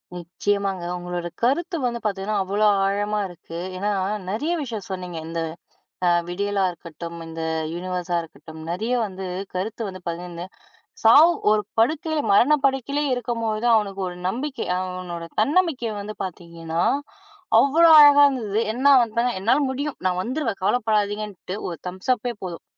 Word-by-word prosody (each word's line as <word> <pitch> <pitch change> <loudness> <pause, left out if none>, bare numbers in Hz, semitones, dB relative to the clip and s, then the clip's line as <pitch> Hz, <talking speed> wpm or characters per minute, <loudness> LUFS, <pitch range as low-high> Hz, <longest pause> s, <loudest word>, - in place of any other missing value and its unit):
நிச்சயமாங்க. 190 +2 -2
உங்களோட 175 0 -4 0.2
கருத்து 335 +8 +1
வந்து 235 -1 -1
பாத்தீங்கன்னா, 200 0 -1
அவ்ளோ 205 +3 +1 0.2
ஆழமா 205 +2 0
இருக்கு. 170 -2 -10 0.2
ஏன்னா 205 +3 -1 0.4
நெறைய 290 +11 -1
விஷயம் 230 -4 -6
சொன்னீங்க. 180 -3 -5
இந்த 165 0 -3 0.7
ஆ, - - +5 0.2
விடியலா 200 +3 -1
இருக்கட்டும் 170 0 -9
இந்த 165 0 -7 0.3
யுனிவர்ஸா 180 0 -2
இருக்கட்டும். 160 0 -12
நெறைய 215 +8 -2
வந்து 190 -1 -7 0.3
கருத்து 205 +5 -3
வந்து 185 -1 -8
பகிர்ந்து. 170 0 -6 0.6
சாவு, 285 +9 +8 0.2
ஒரு 215 0 +3 0.2
படுக்கையில 310 +6 +1
மரணப்படுக்கையில 275 +3 +3
இருக்கும்போது, 230 -2 -2
அவனுக்கு 200 -3 0
ஒரு 175 - -8
நம்பிக்கை. 255 +6 -3
அவனோட 180 -2 -5 0.2
தன்னமிக்கை 285 -2 +1
வந்து 210 +1 -6
பாத்தீங்கன்னா, 170 -2 -5 0.8
அவ்ளோ 320 +5 +5
அழகா 290 -1 +8
இருந்தது. 220 -6 -1
என்ன 260 +4 -1
அவன்தா 235 -1 +2 0.2
என்னால 230 +8 +3
முடியும். 285 +2 -3
நான் 180 0 +1
வந்துருவேன். 245 -3 -3
கவலைப்படாதீங்கன்ட்டு 210 -3 -1
ஒரு 170 - -6
தம்ஸ் 185 +7 -1
அப்பெ 245 +1 -4
போதும். 175 -2 -7
205 Hz, 130 wpm, -23 LUFS, 180-245 Hz, 0.8 s, சாவு